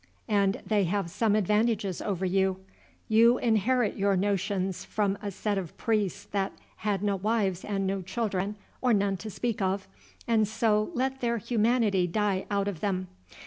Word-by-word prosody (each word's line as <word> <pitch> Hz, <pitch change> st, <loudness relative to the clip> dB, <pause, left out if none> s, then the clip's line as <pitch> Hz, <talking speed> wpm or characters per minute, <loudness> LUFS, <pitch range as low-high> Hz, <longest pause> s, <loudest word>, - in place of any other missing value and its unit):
And 200 Hz, -1 st, +1 dB
they 205 Hz, -3 st, +2 dB
have 185 Hz, -1 st, -1 dB
some 210 Hz, +2 st, +2 dB
advantages 210 Hz, -1 st, +1 dB
over 190 Hz, -3 st, -2 dB
you. 190 Hz, 0 st, +1 dB, 0.5 s
You 230 Hz, +3 st, +5 dB
inherit 235 Hz, 0 st, +2 dB
your 200 Hz, -1 st, +2 dB
notions 195 Hz, -1 st, -1 dB
from 205 Hz, -2 st, 0 dB
a 205 Hz, -, -3 dB
set 200 Hz, +1 st, -1 dB
of 175 Hz, -4 st, -8 dB
priests 210 Hz, -4 st, 0 dB
that 195 Hz, -1 st, -1 dB, 0.2 s
had 205 Hz, -2 st, -1 dB
no 200 Hz, -1 st, +1 dB
wives 200 Hz, -2 st, 0 dB
and 195 Hz, -2 st, -1 dB
no 195 Hz, 0 st, -1 dB
children, 195 Hz, +1 st, -2 dB, 0.3 s
or 250 Hz, -2 st, +3 dB
none 200 Hz, -1 st, +1 dB
to 215 Hz, -, -7 dB
speak 230 Hz, +1 st, -2 dB
of, 190 Hz, +1 st, 0 dB, 0.4 s
and 220 Hz, -2 st, +3 dB
so 215 Hz, -1 st, +1 dB
let 265 Hz, +1 st, -1 dB
their 235 Hz, -1 st, +1 dB
humanity 220 Hz, -4 st, +2 dB
die 195 Hz, +1 st, 0 dB
out 200 Hz, -1 st, 0 dB
of 195 Hz, -6 st, -3 dB
them. 185 Hz, -1 st, -2 dB
205 Hz, 165 wpm, -28 LUFS, 195-220 Hz, 0.5 s, You